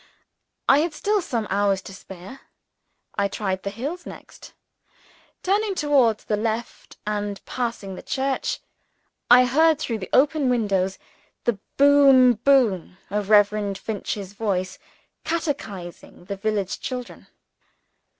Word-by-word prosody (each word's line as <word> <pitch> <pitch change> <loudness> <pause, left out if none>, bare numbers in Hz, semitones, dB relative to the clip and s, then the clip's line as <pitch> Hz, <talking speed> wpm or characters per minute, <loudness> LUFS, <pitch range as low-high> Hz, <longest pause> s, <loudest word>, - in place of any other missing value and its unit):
I 275 - +6
had 315 0 -1
still 415 +3 +1
some 235 -9 -2
hours 200 -1 +2
to 195 - -10
spare. 190 +6 -11 0.8
I 200 - +3
tried 190 -2 -3
the 200 - -3
hills 280 - -5
next. - - -12 0.9
Turning 400 +1 +1
towards 275 - +2
the 210 - -1
left, 225 +2 -4
and 205 -1 -3
passing 230 -6 -4
the - - -8
church, 270 0 -2 0.7
I 250 +1 +8
heard 315 +5 +4
through 235 -7 -3
the 185 - -7
open 285 0 +3
windows 195 -6 0 0.5
the 235 -4 0 0.2
boom 275 -3 +6
boom 220 -7 +2
of 205 0 -2
Reverend 205 -1 +3
Finch's 200 -2 -5
voice, 190 -3 -2 0.4
catechizing 215 - -5
the 200 - -4
village 200 -1 -2
children. 250 -2 -6
225 Hz, 120 wpm, -23 LUFS, 200-275 Hz, 0.9 s, I